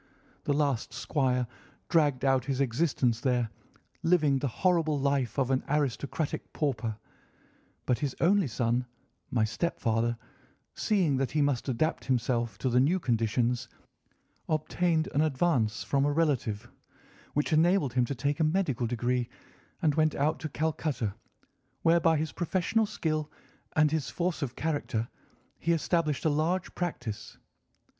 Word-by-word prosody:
The 145 Hz, -, +2 dB
last 140 Hz, -6 st, 0 dB
squire 130 Hz, -2 st, 0 dB, 0.4 s
dragged 145 Hz, -6 st, +2 dB
out 135 Hz, -2 st, +3 dB
his 135 Hz, -1 st, -1 dB
existence 125 Hz, -3 st, +1 dB
there, 125 Hz, -4 st, +1 dB, 0.5 s
living 155 Hz, -5 st, +3 dB
the 140 Hz, -, -1 dB
horrible 160 Hz, +2 st, +1 dB
life 140 Hz, -3 st, 0 dB
of 135 Hz, -1 st, +1 dB
an 130 Hz, -, +1 dB
aristocratic 145 Hz, +1 st, -1 dB
pauper; 115 Hz, -7 st, -1 dB, 0.9 s
but 125 Hz, -, +1 dB
his 140 Hz, -3 st, -2 dB
only 190 Hz, 0 st, +4 dB
son, 120 Hz, +1 st, 0 dB, 0.4 s
my 115 Hz, -3 st, +1 dB
stepfather, 115 Hz, -2 st, 0 dB, 0.6 s
seeing 180 Hz, -10 st, +1 dB
that 135 Hz, -1 st, 0 dB
he 155 Hz, -, +2 dB
must 140 Hz, -2 st, 0 dB
adapt 145 Hz, +6 st, 0 dB
himself 120 Hz, -4 st, 0 dB
to 130 Hz, -, -1 dB
the 125 Hz, -, +4 dB
new 160 Hz, +9 st, +3 dB
conditions, 120 Hz, -2 st, 0 dB, 0.8 s
obtained 160 Hz, +1 st, +1 dB
an 145 Hz, -, +3 dB
advance 135 Hz, -7 st, +1 dB
from 140 Hz, -1 st, +1 dB
a 145 Hz, -, +2 dB
relative, 125 Hz, -8 st, 0 dB, 0.6 s
which 150 Hz, +2 st, +1 dB
enabled 160 Hz, -4 st, +3 dB
him 125 Hz, -1 st, +3 dB
to 140 Hz, -, -4 dB
take 145 Hz, +4 st, -1 dB
a -, -, +3 dB
medical 155 Hz, -, +1 dB
degree 120 Hz, +1 st, -1 dB, 0.5 s
and 155 Hz, -2 st, +4 dB
went 155 Hz, 0 st, +2 dB
out 150 Hz, +3 st, +1 dB
to 155 Hz, -, -4 dB
Calcutta, 150 Hz, -8 st, -1 dB, 0.7 s
where, 165 Hz, +1 st, +5 dB
by 165 Hz, -1 st, +3 dB
his 155 Hz, -1 st, -2 dB
professional 185 Hz, +7 st, 0 dB
skill 155 Hz, -7 st, -2 dB, 0.5 s
and 155 Hz, -1 st, +4 dB
his 160 Hz, -3 st, -1 dB
force 175 Hz, -1 st, -2 dB
of 130 Hz, -3 st, -3 dB
character, 145 Hz, -7 st, -2 dB, 0.5 s
he 170 Hz, -, 0 dB
established 165 Hz, -2 st, 0 dB
a -, -, +5 dB
large 165 Hz, +5 st, 0 dB
practice. 125 Hz, -, -4 dB
140 Hz, 140 wpm, -29 LUFS, 125-160 Hz, 0.9 s, where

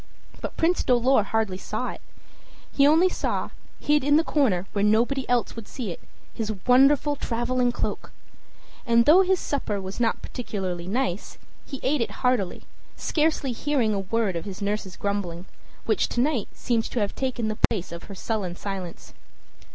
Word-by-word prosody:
But -, -, -6 dB
Prince 345 Hz, +2 st, +2 dB
Dolor 250 Hz, 0 st, +4 dB
hardly 210 Hz, -2 st, -1 dB
saw -, -, -3 dB
it; -, -, -11 dB, 0.7 s
he 280 Hz, 0 st, +4 dB
only 325 Hz, +5 st, +5 dB
saw, -, -, -2 dB, 0.3 s
hid 295 Hz, -1 st, +2 dB
in 290 Hz, +1 st, +4 dB
the 320 Hz, -, +3 dB
corner 225 Hz, -, +1 dB
where 200 Hz, -, 0 dB
nobody 240 Hz, +6 st, +2 dB
else 245 Hz, -1 st, +1 dB
would 230 Hz, -3 st, -8 dB
see 230 Hz, -8 st, -5 dB
it, -, -, -7 dB, 0.3 s
his 220 Hz, -1 st, -3 dB
wonderful 275 Hz, +3 st, +5 dB
traveling 245 Hz, 0 st, 0 dB
cloak. -, -, -4 dB, 0.7 s
And 235 Hz, -1 st, +4 dB
though 330 Hz, +7 st, +8 dB
his 380 Hz, 0 st, +3 dB
supper 220 Hz, -8 st, -2 dB
was 190 Hz, +2 st, -6 dB
not 230 Hz, -2 st, 0 dB
particularly 185 Hz, -8 st, -4 dB
nice, 200 Hz, -3 st, -2 dB, 0.3 s
he 275 Hz, -, -6 dB
ate 275 Hz, 0 st, +1 dB
it 230 Hz, -, 0 dB, 0.2 s
heartily, 245 Hz, -8 st, +1 dB, 0.3 s
scarcely 305 Hz, -4 st, 0 dB
hearing 245 Hz, -3 st, 0 dB
a 200 Hz, -, 0 dB
word 195 Hz, 0 st, 0 dB
of 170 Hz, -, -4 dB
his 195 Hz, -1 st, -7 dB
nurse's 200 Hz, -2 st, -3 dB
grumbling, 190 Hz, -4 st, -3 dB, 0.4 s
which 220 Hz, -3 st, +1 dB
to -, -, -2 dB
night 255 Hz, -4 st, +1 dB
seemed 230 Hz, -2 st, 0 dB
to 245 Hz, -, -3 dB
have 205 Hz, -2 st, 0 dB
taken 255 Hz, -4 st, -2 dB
the 215 Hz, 0 st, -3 dB
place 190 Hz, -7 st, -3 dB
of 170 Hz, 0 st, -7 dB
her 200 Hz, -, -9 dB
sullen 190 Hz, -4 st, -3 dB
silence. 190 Hz, -3 st, -6 dB
230 Hz, 170 wpm, -25 LUFS, 200-270 Hz, 0.7 s, though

